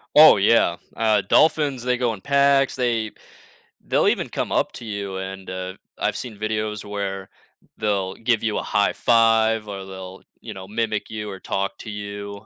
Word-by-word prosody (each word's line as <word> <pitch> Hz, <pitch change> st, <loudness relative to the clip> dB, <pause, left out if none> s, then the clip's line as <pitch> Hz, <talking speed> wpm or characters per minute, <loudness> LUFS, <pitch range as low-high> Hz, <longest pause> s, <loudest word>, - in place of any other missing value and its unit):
Oh, -, -, +9 dB
yeah, -, -, +3 dB, 0.2 s
uh, 110 Hz, -2 st, +2 dB
dolphins, 145 Hz, -4 st, +2 dB
they 125 Hz, 0 st, +1 dB
go 120 Hz, -2 st, 0 dB
in 100 Hz, -, -10 dB
packs, 140 Hz, -1 st, +3 dB
they 115 Hz, -4 st, 0 dB, 0.7 s
they'll -, -, +2 dB
even -, -, +1 dB
come -, -, -3 dB
up -, -, +1 dB
to 120 Hz, -, -9 dB
you, 100 Hz, -3 st, -4 dB
and, 95 Hz, 0 st, -6 dB
uh, 95 Hz, 0 st, -5 dB, 0.3 s
I've -, -, 0 dB
seen 115 Hz, -5 st, -7 dB
videos 110 Hz, -1 st, -2 dB
where 100 Hz, -1 st, -4 dB, 0.5 s
they'll 100 Hz, -3 st, -1 dB
give 115 Hz, -1 st, 0 dB
you 110 Hz, -2 st, 0 dB
a -, -, -2 dB
high 100 Hz, -, +1 dB
five, 115 Hz, -2 st, +3 dB
or 95 Hz, -2 st, -6 dB
they'll, 95 Hz, -1 st, -9 dB, 0.2 s
you -, -, -7 dB
know, 95 Hz, 0 st, -9 dB
mimic 110 Hz, 0 st, -2 dB
you 105 Hz, -1 st, -5 dB
or 95 Hz, -1 st, -7 dB
talk 100 Hz, +2 st, -3 dB
to 110 Hz, -, -8 dB
you, 100 Hz, 0 st, -7 dB
105 Hz, 180 wpm, -23 LUFS, 100-115 Hz, 0.7 s, Oh